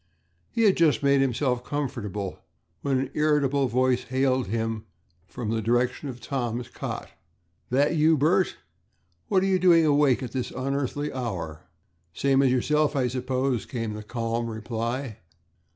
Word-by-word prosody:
He 230 Hz, -, 0 dB
had 200 Hz, -3 st, +5 dB
just 160 Hz, -4 st, +3 dB
made 140 Hz, -1 st, +4 dB
himself 125 Hz, -1 st, 0 dB
comfortable 120 Hz, -9 st, -4 dB, 0.4 s
when 135 Hz, -2 st, +1 dB
an 130 Hz, +1 st, -2 dB
irritable 145 Hz, -3 st, +2 dB
voice 130 Hz, 0 st, +1 dB
hailed 130 Hz, -2 st, +1 dB
him 110 Hz, +1 st, -2 dB, 0.4 s
from 115 Hz, 0 st, -4 dB
the 115 Hz, 0 st, 0 dB
direction 120 Hz, +5 st, 0 dB
of 125 Hz, -2 st, -7 dB
Tom's 120 Hz, -2 st, -3 dB
cot: -, -, -6 dB, 0.6 s
"That 140 Hz, +6 st, +2 dB
you, 160 Hz, +1 st, +4 dB
Bert? 175 Hz, +6 st, +2 dB, 0.7 s
What 190 Hz, -2 st, +2 dB
are -, -, +2 dB
you 190 Hz, -1 st, +2 dB
doing 170 Hz, -3 st, +5 dB
awake 145 Hz, -3 st, +3 dB
at 125 Hz, -, -5 dB
this 130 Hz, -1 st, -3 dB
unearthly 140 Hz, +2 st, -2 dB
hour?" 90 Hz, -, -5 dB, 0.5 s
"Same 135 Hz, -1 st, +3 dB
as 135 Hz, -2 st, +3 dB
yourself, 150 Hz, +4 st, +2 dB
I 130 Hz, -3 st, +1 dB
suppose," 130 Hz, -2 st, -1 dB
came 115 Hz, -4 st, -3 dB
the 105 Hz, -, -6 dB
calm 115 Hz, +1 st, -2 dB
reply. 115 Hz, +2 st, -4 dB
130 Hz, 150 wpm, -26 LUFS, 115-145 Hz, 0.7 s, had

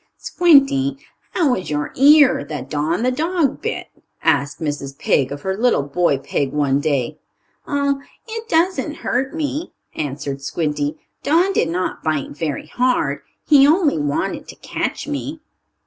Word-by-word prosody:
"Squinty, 275 Hz, -5 st, +3 dB, 0.4 s
how 310 Hz, -8 st, +2 dB
is 185 Hz, -, -3 dB
your 150 Hz, -1 st, -2 dB
ear 285 Hz, -, +6 dB
that 140 Hz, -3 st, -6 dB
Don, 155 Hz, +7 st, 0 dB
the 255 Hz, -, +2 dB
dog, 320 Hz, +1 st, 0 dB
bit?" -, -, -4 dB, 0.3 s
asked 140 Hz, +1 st, +1 dB
Mrs. 145 Hz, -3 st, -4 dB
Pig 135 Hz, -2 st, +1 dB
of 145 Hz, 0 st, -6 dB
her 190 Hz, 0 st, -1 dB
little 235 Hz, -, +2 dB
boy 145 Hz, +1 st, +1 dB
pig 140 Hz, 0 st, -2 dB
one 140 Hz, -2 st, +2 dB
day. 140 Hz, -5 st, -1 dB, 0.5 s
"Oh, 280 Hz, -1 st, 0 dB, 0.3 s
it 455 Hz, 0 st, -6 dB
doesn't 330 Hz, -2 st, +1 dB
hurt 265 Hz, +4 st, -1 dB
me," 310 Hz, +1 st, -3 dB, 0.2 s
answered 140 Hz, -1 st, -4 dB
Squinty. 150 Hz, 0 st, -2 dB, 0.2 s
"Don 345 Hz, +6 st, +3 dB
did 170 Hz, -, +1 dB
not 180 Hz, +2 st, -2 dB
bite 155 Hz, -3 st, -1 dB
very 150 Hz, -1 st, -3 dB
hard. 250 Hz, 0 st, 0 dB, 0.3 s
He 280 Hz, -2 st, +6 dB
only 310 Hz, -, +3 dB
wanted 145 Hz, -1 st, -2 dB
to -, -, -10 dB
catch -, -, -4 dB
me." 295 Hz, +1 st, -4 dB
190 Hz, 150 wpm, -20 LUFS, -, 0.5 s, ear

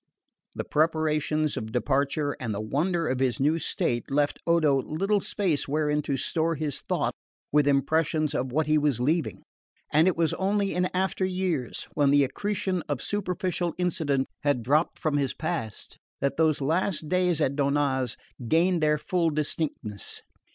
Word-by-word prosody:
The -, -, -3 dB
preparations 155 Hz, -1 st, +1 dB
of 110 Hz, 0 st, -5 dB
departure 140 Hz, +4 st, 0 dB
and 115 Hz, -5 st, -3 dB
the -, -, -3 dB
wonder 160 Hz, -, 0 dB
of 130 Hz, 0 st, -1 dB
his 130 Hz, -2 st, +1 dB
new 150 Hz, +4 st, +2 dB
state 120 Hz, -5 st, -1 dB
left 145 Hz, +1 st, +1 dB
Odo 155 Hz, -5 st, +4 dB
little 195 Hz, +9 st, 0 dB
space 185 Hz, -6 st, -1 dB
wherein 150 Hz, +1 st, +1 dB
to 140 Hz, -2 st, -2 dB
store 165 Hz, +4 st, 0 dB
his 150 Hz, -2 st, -3 dB
thought -, -, -1 dB, 0.4 s
with 145 Hz, -1 st, +3 dB
impressions 155 Hz, +2 st, +1 dB
of 130 Hz, 0 st, -2 dB
what 155 Hz, +4 st, +1 dB
he 155 Hz, +1 st, +3 dB
was 145 Hz, -5 st, +1 dB
leaving; 155 Hz, +6 st, 0 dB, 0.5 s
and 155 Hz, +3 st, +5 dB
it 185 Hz, -, +2 dB
was 165 Hz, -2 st, +2 dB
only 200 Hz, +1 st, 0 dB
in 180 Hz, +1 st, +1 dB
after 190 Hz, +1 st, -1 dB
years, 180 Hz, -9 st, -2 dB
when 145 Hz, -2 st, +3 dB
the 145 Hz, 0 st, +5 dB
accretion 190 Hz, +6 st, -2 dB
of 145 Hz, -3 st, -1 dB
superficial 180 Hz, -3 st, -2 dB
incident 155 Hz, -6 st, 0 dB
had 140 Hz, -5 st, +1 dB
dropped 150 Hz, +7 st, +2 dB
from 150 Hz, -2 st, 0 dB
his 140 Hz, -2 st, -1 dB
past, 155 Hz, -, -4 dB, 0.2 s
that 140 Hz, 0 st, 0 dB
those 155 Hz, -2 st, +2 dB
last 165 Hz, +3 st, 0 dB
days 180 Hz, -1 st, +2 dB
at 140 Hz, -3 st, +1 dB
Donnaz 140 Hz, -3 st, +1 dB, 0.3 s
gained 170 Hz, +4 st, +3 dB
their 150 Hz, 0 st, +3 dB
full 170 Hz, +2 st, 0 dB
distinctness. 145 Hz, -8 st, -3 dB
155 Hz, 160 wpm, -27 LUFS, 140-170 Hz, 0.5 s, and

